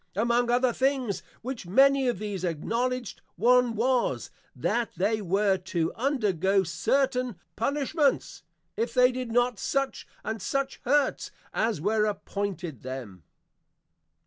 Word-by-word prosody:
Among 235 +3 +2
other 245 0 +3
things 260 -6 0 0.2
which 250 -6 -5
many 270 +6 +5
of 240 - +1
these 205 -2 -4
Acknowledged, 235 +8 -2
one 245 +3 +4
was, 245 +2 0 0.2
That 240 -1 0
they 215 +3 +1
were 195 +1 +2
to 175 -3 -2
undergo 200 - +1
certain 250 +8 0 0.2
Punishments, 280 +4 0 0.3
if 455 - -2
they 250 0 +6
did 250 -2 -4
not 245 -2 +2
such 275 -1 -1 0.2
and 220 -1 -4
such 275 +7 -2
Hurts, 280 +2 +2 0.2
as 220 -6 0
were 210 +3 +2
appointed 195 - -4
them. 120 - -7
230 Hz, 120 wpm, -27 LUFS, 195-255 Hz, 0.3 s, they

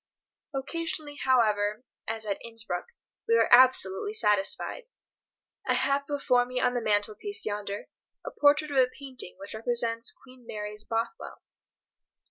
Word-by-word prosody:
Occasionally, 295 +1 -4
however, 215 -4 +2 0.2
as 225 0 -3
at 200 -2 -3
Innsbruck, 225 - -4 0.4
we 460 - +4
are - - +4
absolutely 255 - +5
satisfied. 210 - +1 0.8
I - - +3
have 280 0 +1
before 275 -4 +2
me 250 +1 -3
on 250 0 +2
the 245 - -1
mantelpiece 215 - -1
yonder 205 -1 -4 0.4
a - - -4
portrait 295 +1 +3
of 280 - -1
a 255 -1 +6
painting 260 -8 -8
which 195 +1 -8
represents 230 0 +1
Queen 255 -1 -17
Mary's 210 0 -4
Bothwell. 230 - -4
245 Hz, 130 wpm, -28 LUFS, 210-280 Hz, 0.8 s, a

